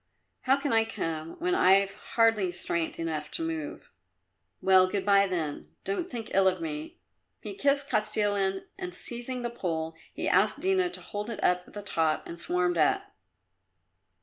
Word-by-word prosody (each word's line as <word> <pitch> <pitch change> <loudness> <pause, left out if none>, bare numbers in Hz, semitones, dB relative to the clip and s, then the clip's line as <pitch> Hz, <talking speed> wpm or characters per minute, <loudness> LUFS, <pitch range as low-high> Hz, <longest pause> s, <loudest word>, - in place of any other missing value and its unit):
How 265 +1 +5
can 280 -2 -1
I 225 0 +5
come 165 -7 -4
when 360 +1 0
I've 195 - +4
hardly 215 -2 +2
strength 170 -1 -2
enough 160 -2 -3
to 330 - -2
move?" 325 -2 -5 0.7
"Well, 190 -1 +5
good 195 0 -2
bye, 200 -1 +5
then. 150 - -4
Don't 200 - -2
think 230 -3 -6
ill 195 0 +5
of 185 -1 +2
me." 155 -1 -5 0.4
He - - -6
kissed 280 -6 +1
Kostilin, 205 -3 +1 0.2
and 365 -1 -5
seizing 245 +1 -5
the 240 - -2
pole, 165 -7 -3 0.2
he - - -3
asked - - +3
Dina 375 -1 +2
to - - -5
hold 210 +2 -5
it 230 - -5
at 180 0 +1
the 205 - -7
top 160 -5 0
and 170 - -8
swarmed 175 0 +1
up. 150 - +2
195 Hz, 165 wpm, -28 LUFS, 170-240 Hz, 0.7 s, How